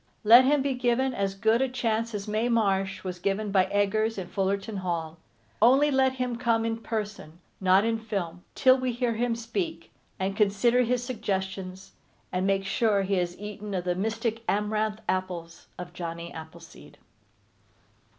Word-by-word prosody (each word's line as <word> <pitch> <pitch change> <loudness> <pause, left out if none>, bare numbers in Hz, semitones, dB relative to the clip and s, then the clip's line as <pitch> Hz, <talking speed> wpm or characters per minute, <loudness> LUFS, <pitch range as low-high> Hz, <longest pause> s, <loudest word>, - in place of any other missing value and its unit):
Let 235 +4 +8
him 285 0 +3
be 275 -1 0
given 250 +1 +1
as 195 -2 -2
good 220 +4 +2
a 265 - +1
chance 230 -2 -1
as 200 0 -5
Mae 215 +3 0
Marsh 195 -4 +1
was 180 -1 -5
given 200 +3 -1
by 190 -2 +4
Eggers 215 +2 0
in 180 -2 -5
Fullerton 195 +2 -1
Hall. 170 -3 -3 0.4
Only 270 +6 +5
let 265 -1 +3
him 250 -2 -2
come 230 -2 +1
in 225 0 -1
person, 210 -8 -5 0.2
not 190 +2 +4
in 225 0 0
film, 180 -6 -4
till 260 0 +5
we 255 -1 -1
hear 240 0 0
him 235 +1 0
speak, 195 -8 -4 0.3
and 190 +1 -2
consider 210 +4 +3
his 245 0 0
suggestions, 190 -5 -4 0.4
and 185 +1 0
make 195 0 +1
sure 200 0 +2
he 195 0 0
has 175 0 -2
eaten 210 -1 -6
of 180 - -1
the 180 0 0
mystic 225 +4 -2
Amaranth 215 +1 0
Apples 180 -3 -3
of 175 -1 -8
Johnny 170 -1 -6
Appleseed. 160 +1 -12
210 Hz, 165 wpm, -27 LUFS, 190-230 Hz, 0.4 s, Let